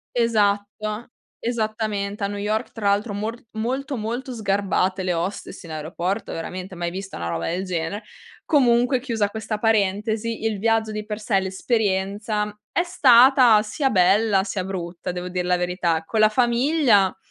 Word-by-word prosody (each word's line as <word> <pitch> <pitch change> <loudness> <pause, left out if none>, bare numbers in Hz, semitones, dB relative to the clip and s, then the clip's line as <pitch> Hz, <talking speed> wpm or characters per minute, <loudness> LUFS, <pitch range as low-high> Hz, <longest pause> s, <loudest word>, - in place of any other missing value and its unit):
Esatto. 215 -1 0 0.3
Esattamente 215 -3 -2
a - - +2
New 205 0 -5
York 215 +2 -2
tra 210 -3 -1
l'altro 205 +2 0
mor 220 +4 -4
molto, 260 +5 -3
molto 240 +3 -4
sgarbate 195 -3 0
le 180 - 0
hostess 180 +3 -4
in 165 - -10
aeroporto, 170 +6 -3
veramente, 185 +3 -6
mai 175 -1 -3
vista 195 +2 -7
una 85 - -4
roba 85 0 -2
del 180 +3 -2
genere. 180 +3 -3 0.4
Comunque 250 -3 +3
chiusa 225 -6 -1
questa 220 0 -4
parentesi, 220 +1 0
il 220 -2 0
viaggio 220 +1 +1
di 215 0 -5
per 210 0 -5
sé, 210 -2 +1
l'esperienza 205 +1 -1
è 345 - +2
stata 255 - +6
sia 265 +6 -1
bella 195 0 +3
sia 195 -1 -3
brutta 180 -2 -5
devo 180 0 -5
dir 180 0 -2
la 180 0 +2
verità. 175 -2 0
Con 220 - -2
la 215 - +6
famiglia 240 - +3
210 Hz, 155 wpm, -23 LUFS, 190-225 Hz, 0.4 s, stata